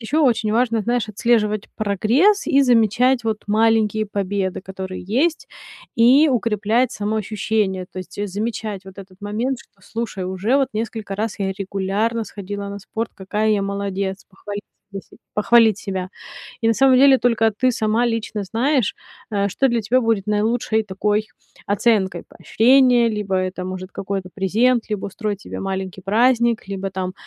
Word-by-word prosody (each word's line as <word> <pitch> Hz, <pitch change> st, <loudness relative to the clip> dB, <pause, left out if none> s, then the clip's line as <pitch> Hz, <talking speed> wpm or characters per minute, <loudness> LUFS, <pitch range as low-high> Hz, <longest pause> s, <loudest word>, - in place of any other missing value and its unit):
ещё 295 Hz, +7 st, 0 dB
очень 230 Hz, -5 st, +2 dB
важно, 230 Hz, -1 st, +2 dB
знаешь, 240 Hz, 0 st, -1 dB
отслеживать 215 Hz, -1 st, +1 dB
прогресс 230 Hz, -, +2 dB
и 280 Hz, -4 st, +4 dB
замечать, 245 Hz, +1 st, +3 dB
вот, 220 Hz, -1 st, -1 dB
маленькие 215 Hz, 0 st, +2 dB
победы, 195 Hz, -2 st, -2 dB
которые 190 Hz, -1 st, -7 dB
есть, 270 Hz, -, 0 dB, 0.5 s
и 260 Hz, +7 st, +6 dB
укреплять 230 Hz, 0 st, +1 dB
самоощущение. 210 Hz, -2 st, -1 dB
То 185 Hz, -, -7 dB
есть, 185 Hz, -, -9 dB
э, 205 Hz, -, -1 dB
замечать 210 Hz, 0 st, -4 dB
вот 190 Hz, 0 st, -12 dB
этот 190 Hz, 0 st, -13 dB
момент, 230 Hz, +6 st, -2 dB
что: 195 Hz, -, -23 dB
"Слушай, 225 Hz, -4 st, -5 dB
уже 190 Hz, +8 st, 0 dB
вот 270 Hz, -2 st, +2 dB
несколько 215 Hz, -2 st, -4 dB
раз 220 Hz, 0 st, -3 dB
я 195 Hz, -1 st, 0 dB
регулярно 200 Hz, +4 st, -2 dB
сходила 200 Hz, 0 st, -6 dB
на 200 Hz, -, -6 dB
спорт, 220 Hz, +3 st, -5 dB
какая 210 Hz, +3 st, -1 dB
я 210 Hz, -2 st, +2 dB
молодец". 195 Hz, -1 st, -3 dB
Похвалить 205 Hz, +2 st, -7 dB, 0.3 s
саму 195 Hz, -1 st, -7 dB
себ -, -, -20 dB, 0.2 s
похвалить 220 Hz, -1 st, +4 dB
себя. 190 Hz, -3 st, -4 dB, 0.5 s
И, -, -, +2 dB
на -, -, +5 dB
самом 265 Hz, 0 st, +5 dB
деле, 270 Hz, 0 st, +6 dB
только 225 Hz, -2 st, +2 dB
ты 255 Hz, 0 st, +3 dB
сама 225 Hz, +2 st, +1 dB
лично 225 Hz, -2 st, -2 dB
знаешь, 245 Hz, +3 st, 0 dB, 0.4 s
э, 200 Hz, -1 st, 0 dB
что 270 Hz, +7 st, +1 dB
для 235 Hz, -2 st, 0 dB
тебя 245 Hz, +5 st, +2 dB
будет 225 Hz, -4 st, 0 dB
наилучшей 220 Hz, +1 st, +1 dB
такой 210 Hz, +2 st, -1 dB, 0.4 s
оценкой: 205 Hz, -2 st, +1 dB
поощрения, 245 Hz, 0 st, +4 dB
либо 210 Hz, -3 st, -2 dB
это 185 Hz, 0 st, -2 dB
может 185 Hz, 0 st, -6 dB
какой-то 195 Hz, -1 st, -4 dB
презент, 225 Hz, +5 st, +2 dB
либо 210 Hz, -2 st, -2 dB
устроить 205 Hz, 0 st, -4 dB
себе -, -, -7 dB
маленький 190 Hz, -1 st, -4 dB
праздник, 235 Hz, +3 st, +2 dB
либо 195 Hz, 0 st, -4 dB
там 185 Hz, -1 st, -4 dB
215 Hz, 160 wpm, -21 LUFS, 195-235 Hz, 0.5 s, и